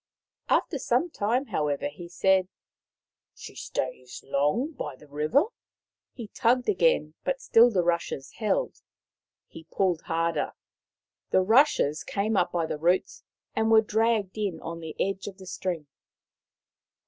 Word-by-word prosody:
' - - -67
After 285 - +1
some 255 +8 +1
time, 235 +5 0
however, 150 - -1
he 180 -12 -9
said: 190 +1 +2 0.4
" - - -67
She - - -10
stays 130 -1 -5
long 150 - +1
by 150 - -6
the 150 - -17
river." 150 - +2 0.7
He 230 -4 -8
tugged 250 +1 +1
again, 485 +5 +2
but - - -1
still 235 - +5
the 190 -6 +1
rushes 170 -5 -1
held. 370 - -1 0.6
He 160 - -13
pulled 180 -4 0
harder. 165 0 -1 0.8
The 185 - +4
rushes 220 - +3
came 210 +2 -1
up 180 -2 +2
by 170 -2 0
the 150 - -4
roots 175 +4 +1 0.3
and 220 0 +1
were 220 -1 +7
dragged 220 -2 0
in 195 -6 -2
on 165 0 -6
the 160 -2 -7
edge 195 0 -1
of 195 -2 -7
the 190 - -12
string. 180 -3 -4
190 Hz, 150 wpm, -27 LUFS, 165-235 Hz, 0.8 s, were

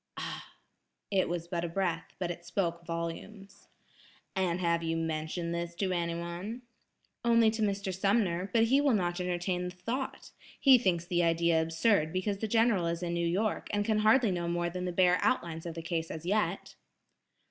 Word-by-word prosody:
"Ah!" - - -6 0.6
It 190 -2 +2
was 170 -1 -3
but 170 -1 -2
a 175 - -2
breath, 180 0 -2
but 180 -2 -2
it 175 0 -8
spoke 170 -1 -2
volumes. 170 +4 -6 0.7
"And 185 -2 0
have 170 -2 +1
you 165 0 -1
mentioned 165 +1 -2
this 170 0 -4
to 190 +1 -1
anyone?" 170 +6 -3 0.6
"Only 230 -2 +5
to 220 0 -4
Mr. 200 -2 -1
Sumner, 195 -2 +1
but 225 -1 +4
he 265 +5 +4
will 280 -5 +3
not 175 -2 -1
entertain 180 0 -1
the - - -3
thought. 235 +9 -4 0.3
He 265 -3 +7
thinks 175 -6 +1
the 175 -1 +1
idea 165 -1 +3
absurd 165 +1 +2
because 195 +2 -1
the 220 - -2
General 225 -5 +3
is 170 +1 -2
in 170 -1 -2
New 170 0 0
York, 200 +5 -1
and 205 0 0
can 215 -1 +2
hardly 220 +1 +4
know 175 -1 -2
more 175 0 -1
than 180 +1 -4
the 180 - -1
bare 180 0 +4
outlines 170 -11 0
of 165 - -6
the 165 - -6
case 165 -1 -2
as 160 +1 -7
yet." 195 -1 -1
180 Hz, 185 wpm, -30 LUFS, 170-205 Hz, 0.7 s, He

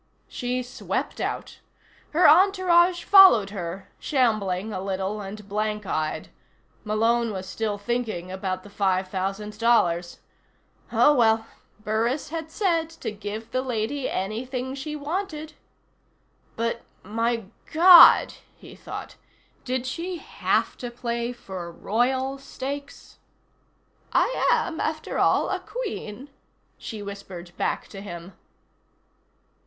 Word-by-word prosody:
She 250 0 -3
swept 245 - -4
out. - - -4 0.5
Her 330 +2 +5
entourage 360 0 +5
followed 375 - +7
her, 185 -1 -6
shambling 215 - 0
a 185 - -3
little, 195 +2 -3
and 205 +1 -8
blank 210 0 -2
eyed. 155 -4 -2 0.5
Malone 225 +2 +1
was 190 -2 -5
still 210 +2 -2
thinking 215 -5 -3
about 190 -1 -3
the 205 - -12
five 190 -2 0
thousand 195 +3 -4
dollars. 175 -7 +2 0.7
Oh, 295 - +5
well, 225 -4 +3 0.4
Burris 225 +7 -1
had 320 0 -5
said 330 -3 0
to 330 - -6
give 210 +2 -7
the 255 - 0
lady 255 +2 -2
anything 250 +6 -3
she 300 +3 -5
wanted. 310 0 -4 1.0
But 230 +1 -2 0.2
my 230 +3 -1 0.3
God! 340 +1 +9 0.2
he - - -14
thought. - - -8 0.5
Did 255 0 -2
she 345 +7 -4
have - - -1
to 245 - -5
play 235 0 -3
for 185 -7 -8
royal 260 +9 -1
stakes? 280 +1 -7 0.9
"I - - +2
am, 335 -2 0
after 310 0 -2
all, - - +3
a - - -1
Queen," 290 - -6 0.5
she 215 -3 -7
whispered 190 -3 -9
back - - -2
to 195 - -9
him. 175 -2 -8
230 Hz, 115 wpm, -25 LUFS, 200-280 Hz, 1.0 s, God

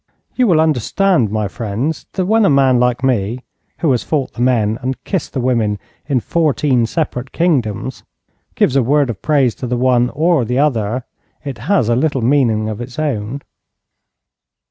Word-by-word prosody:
You 250 -2 +3
will 170 -5 +4
understand, 160 - +2
my 105 0 -1
friends, 115 +9 -4
that 185 - -1
when 220 +3 +3
a 195 - +4
man 135 -3 +4
like 125 +1 +1
me, 120 -2 0 0.4
who 160 - +2
has 125 - +1
fought 145 -5 -2
the 120 - -6
men 115 -3 +1
and 130 +1 -4
kissed 190 -6 -3
the 135 - -2
women 115 -5 0 0.3
in 135 -4 +1
fourteen 145 -4 +1
separate 130 -4 -3
kingdoms, 135 - -1 0.5
gives 130 - +2
a 135 - +4
word 140 +1 +2
of 100 - -10
praise 140 -6 +2
to 125 - -2
the 125 0 -1
one 125 -1 +2
or 160 -1 +1
the 125 +2 -2
other, 125 -4 0 0.4
it 135 -6 -5
has 195 - +3
a 120 - +2
little 135 -1 0
meaning 115 -5 +2
of 110 +1 -5
its 120 0 -8
own. 140 -3 -3
130 Hz, 175 wpm, -17 LUFS, 115-150 Hz, 0.5 s, will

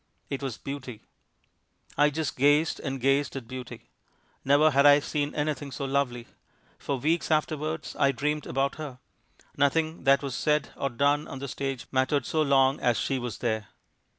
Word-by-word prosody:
It 140 - -3
was 135 -5 -4
Beauty. 130 -5 -7 0.9
I 145 0 +4
just 150 -1 -3
gazed 145 +4 +3
and 135 -2 -4
gazed 135 +1 +1
at 130 -4 -6
Beauty. 130 -1 -9 0.5
Never 145 +3 +5
had 140 0 +4
I 145 0 +8
seen 145 0 -2
anything 145 -2 -2
so 140 - -4
lovely. 135 -3 -1 0.5
For 140 - -2
weeks 160 +6 0
afterwards 155 0 -1
I 140 - +3
dreamed 150 +3 -2
about 135 +1 -1
her. 145 -5 -7 0.6
Nothing 155 +3 0
that 140 +1 +4
was 135 -2 -3
said 150 +2 +1
or 140 - -2
done 145 +4 +1
on - - -7
the 140 +1 -5
stage 135 -1 -4
mattered 130 0 +1
so 160 - 0
long 135 -1 +3
as 120 -2 +2
she 135 -2 -1
was 120 -4 -5
there. 110 -4 -2
140 Hz, 170 wpm, -27 LUFS, 130-150 Hz, 0.9 s, I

